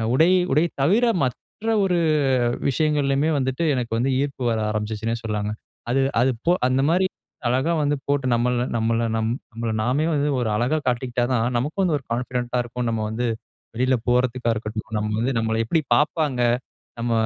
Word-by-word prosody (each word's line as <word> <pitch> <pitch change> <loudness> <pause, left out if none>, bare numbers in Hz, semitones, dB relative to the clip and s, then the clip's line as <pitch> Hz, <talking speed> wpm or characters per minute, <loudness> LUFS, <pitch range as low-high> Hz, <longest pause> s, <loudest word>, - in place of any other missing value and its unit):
உடை 165 +6 +5 0.2
உடை 155 +4 +4 0.2
தவிர, 210 - +4 0.2
மற்ற 170 - -5 0.2
ஒரு 180 -2 +1 0.7
விஷயங்கள்லயுமே 145 +1 +1
வந்துட்டு 130 +4 -1
எனக்கு 120 -3 -3
வந்து 135 +2 +1
ஈர்ப்பு 140 -2 -3
வர 110 - 0
ஆரம்பிச்சுச்சுன்னே 110 +2 -2
சொல்லலாம்ங்க. 105 -1 -2 0.4
அது 135 - +2 0.2
அது 130 +2 +3 0.2
போ 175 - +6 0.2
அந்த 130 +1 +2
மாரி 185 +3 +3 0.4
அழகா 130 +7 +1
வந்து 145 0 +1
போட்டு 140 -1 0
நம்மள 120 +1 +1
நம்மள 115 +1 +1
நம் 110 0 0 0.2
நம்மள 115 0 -4
நாமே 135 +7 +1
வந்து 145 0 +1
ஒரு 115 -3 0
அழகா 125 +8 +1
காட்டிக்கிட்டா 120 0 0
தான் 120 +1 +1
நமக்கு 145 +10 -3
வந்து 175 -5 +2
ஒரு 135 - -11
கான்ஃபிடென்ட்டா 125 0 -2
இருக்கும். 120 0 -4
நம்ம 110 -1 -1
வந்து 115 +3 -2 0.5
வெளில 130 +2 +2
போறதுக்கா 125 -1 +1
இருக்கட்டும், 110 0 -5
நம்ம 105 0 -1
வந்து 125 +4 0
நம்மள 110 0 0
எப்படி 160 +7 +1
பாப்பாங்க. 150 -1 +1 0.6
நம்ம 120 0 -1
125 Hz, 165 wpm, -23 LUFS, 115-145 Hz, 0.7 s, போ